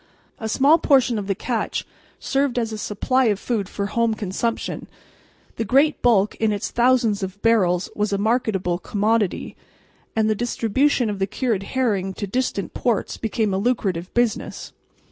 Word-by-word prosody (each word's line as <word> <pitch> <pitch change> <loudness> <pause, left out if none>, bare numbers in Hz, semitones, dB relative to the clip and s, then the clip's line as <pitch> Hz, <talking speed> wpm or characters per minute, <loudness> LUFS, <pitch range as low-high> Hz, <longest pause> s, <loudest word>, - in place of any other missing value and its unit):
A 220 - -4
small 285 +8 +4
portion 260 -6 +3
of 200 - -5
the 195 - 0
catch 230 +2 -2 0.3
served 275 -2 0
as 230 -2 0
a 215 - -4
supply 255 +6 0
of 205 -3 +1
food 215 -6 -2
for 200 - -3
home 225 +2 0
consumption, 215 +3 -3 0.7
the - - 0
great 275 +8 +3
bulk 210 -4 +3
in 220 -1 +1
its 205 -1 -3
thousands 235 -4 +2
of 190 +1 -5
barrels 190 -6 +3
was 210 0 0
a 200 - +1
marketable 205 -5 0
commodity, 210 +1 0 0.6
and 220 -1 +2
the 215 - +3
distribution 240 +3 +1
of 205 -2 -3
the 195 - 0
cured 215 -1 -1 0.2
herring 195 -7 0
to 205 - -3
distant 200 -4 -2
ports 235 -4 -1
became 220 -2 -1
a 190 - 0
lucrative 195 -6 -1
business. 240 -2 -1
220 Hz, 165 wpm, -22 LUFS, 200-240 Hz, 0.7 s, small